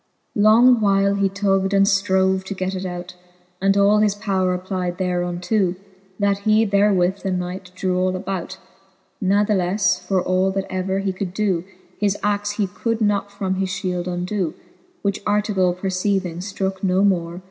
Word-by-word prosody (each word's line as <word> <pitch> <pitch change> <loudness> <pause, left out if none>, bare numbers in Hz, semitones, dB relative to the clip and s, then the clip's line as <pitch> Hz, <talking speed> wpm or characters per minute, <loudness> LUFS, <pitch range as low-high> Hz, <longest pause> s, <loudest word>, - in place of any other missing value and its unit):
XXII. 205 - 0
Long 235 +3 +6
while 200 -1 +3
he 200 -1 +1
tug'd 195 0 +1
and 195 0 +5
ftrove, 190 -2 +2
to 200 - -5
get 185 0 -2
it 190 0 -4
out, 180 0 -7 0.5
And 195 +1 +3
all 200 +1 +4
his 210 -1 +2
powre 190 -3 0
applyed 180 -1 -3
thereunto, 180 +1 0 0.4
That 200 -1 +1
he 215 +2 +3
therewith 200 -2 +2
the 195 - -4
knight 180 0 -4
drew 185 0 -1
all 185 0 +1
about: 190 0 -4 0.7
Kathleflc, 195 -1 +2
for 190 -1 +2
all 185 +1 +1
that 195 0 -2
ever 190 +1 -1
he 195 -1 -1
could 185 -1 -5
doe. 195 -5 0 0.4
His 205 -1 +1
axe 205 0 0
he 205 -1 0
could 230 +4 -3
not 205 -2 0
from 195 -2 -2
his 190 0 -1
fhield 185 -2 -3
undoe. 180 -1 -2 0.5
Which 200 0 -1
Artegall 205 -4 +1
perceiving, 185 -2 -1
ftrooke 190 0 -3
no 190 0 +2
more. 175 -3 0
195 Hz, 165 wpm, -21 LUFS, 185-200 Hz, 0.7 s, Long